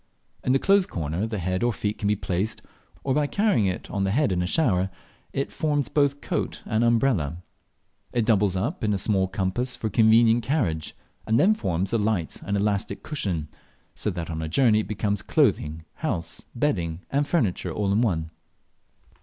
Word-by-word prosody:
In 125 - +1
the 135 - +5
closed 195 +5 +3
corner 85 +5 -2
the 110 -1 -3
head 95 0 -1
or 120 - +2
feet 105 -1 -3
can 100 - -1
be 105 - +3
placed, 95 +2 -2 0.4
or 135 - +1
by 145 +1 +2
carrying 200 - +2
it 90 - -3
on 100 -2 -1
the 95 - +1
head 135 +4 +2
in 90 -1 +1
a 90 - -1
shower 95 - +2 0.4
it 135 - -2
forms 145 -3 0
both 145 -1 +1
coat - - -3
and 110 +2 +1
umbrella. 115 - +2 0.7
It 120 -2 +1
doubles 105 -4 +3
up 120 - -2
ix 105 - +2
a - - 0
small 95 -1 +1
compass 95 +7 -1
for 110 - -3
convenient 115 +1 +5
carriage, 105 - -1 0.3
and 110 +1 +3
then 210 +3 +5
forms 95 - -2
a 115 - +3
light 105 -6 -1
and 100 +3 -1
elastic 100 -1 -1
cushion, 95 - -2 0.5
so - - -2
that 85 -2 -4
on 80 0 -3
a 80 - -3
journey 110 - +4
it 110 - -3
becomes 105 -1 -1
clothing, 80 +1 +1
house, 90 - -3
bedding, 90 - -1
and 145 +1 +1
furniture, 115 - 0
all 100 -2 -1
in 105 +3 +3
one. 80 -8 0
105 Hz, 185 wpm, -25 LUFS, 90-125 Hz, 0.7 s, the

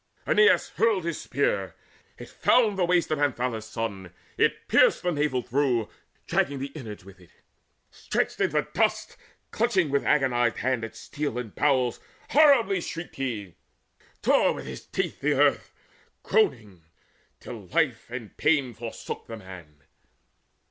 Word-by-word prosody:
Aeneas 440 +1 +4
hurled 220 -5 +2
his 170 -2 -3
spear; - - -1 0.4
it - - -10
found 225 -5 +2
the 185 -2 +1
waist 175 -2 +1
Of 155 - 0
Anthalus' 125 -6 -1
son, 100 -6 -5 0.2
it - - +1
pierced - - +4
the 180 - +1
navel 145 -5 0
through, 125 -4 0 0.4
Dragging 140 - 0
the 135 +1 -5
inwards 110 - -9
with 95 -1 -14
it. 90 - -19 0.6
Stretched - - -2
in - - +3 0.2
dust, - - 0 0.4
Clutching 195 - +1
with 140 - +1
agonized 120 -5 +2
hands 125 -3 -1
at 115 0 -11
steel 145 0 -4
and 120 -4 -5
bowels, 130 -5 +1 0.3
Horribly 255 - +5
shrieked 165 +1 -7
he, 110 -9 -4 0.7
tore - - +4
with - - -7
his - - -9
teeth - - -3
the 150 +1 +2
earth 145 +1 +2 0.5
Groaning, 120 - 0 0.6
till 105 -6 -9
life 145 - 0
and 120 -3 -8
pain 145 -5 +2
forsook 115 +1 -7
the 115 - -7
man. 90 -7 -13
130 Hz, 140 wpm, -26 LUFS, 115-165 Hz, 0.7 s, Horribly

